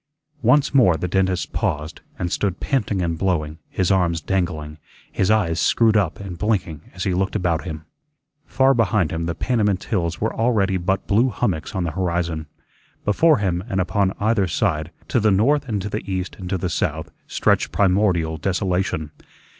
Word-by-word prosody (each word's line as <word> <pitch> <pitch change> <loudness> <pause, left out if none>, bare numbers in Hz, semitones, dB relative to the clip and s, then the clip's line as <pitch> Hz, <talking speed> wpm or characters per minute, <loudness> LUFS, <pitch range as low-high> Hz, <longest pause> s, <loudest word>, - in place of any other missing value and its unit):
Once 145 -2 +3
more 115 -12 +5
the 90 - -2
dentist 95 0 0
paused, 75 +2 -2 0.2
and 90 -1 -3
stood 95 -3 -1
panting 105 -8 0
and 85 -1 -2
blowing, 80 -5 -1
his 95 0 0
arms 90 -3 +2
dangling, 80 -4 -2 0.3
his 95 - 0
eyes 95 -7 +2
screwed 110 +7 +3
up 105 +1 +1
and 95 -4 -7
blinking 95 -8 -1
as 90 - -4
he 95 - 0
looked 95 +3 -1
about 85 -4 0
him. 80 -3 -6 0.6
Far 135 +1 +3
behind 105 - +1
him 85 0 -2
the 85 - -2
Panamint 105 -6 0
hills 85 -5 -2
were - - -1
already 105 -5 +1
but 95 +2 -1
blue 115 +6 +3
hummocks 100 -7 -2
on 95 - 0
the 85 - -2
horizon. 85 -3 -2 0.6
Before 155 +10 +4
him 90 -4 -1
and 95 - -1
upon 95 +1 +1
either 105 -2 +2
side, 85 -4 0 0.2
to 120 - +2
the 110 -1 +3
north 135 +8 +2
and 105 -2 -1
to 105 - -3
the 105 - -3
east 95 0 -3
and 90 -1 -6
to 95 - 0
the 90 - -2
south, - - -2 0.2
stretched - - +1
primordial 90 -5 +2
desolation. 90 -3 -1
95 Hz, 180 wpm, -22 LUFS, 85-105 Hz, 0.6 s, more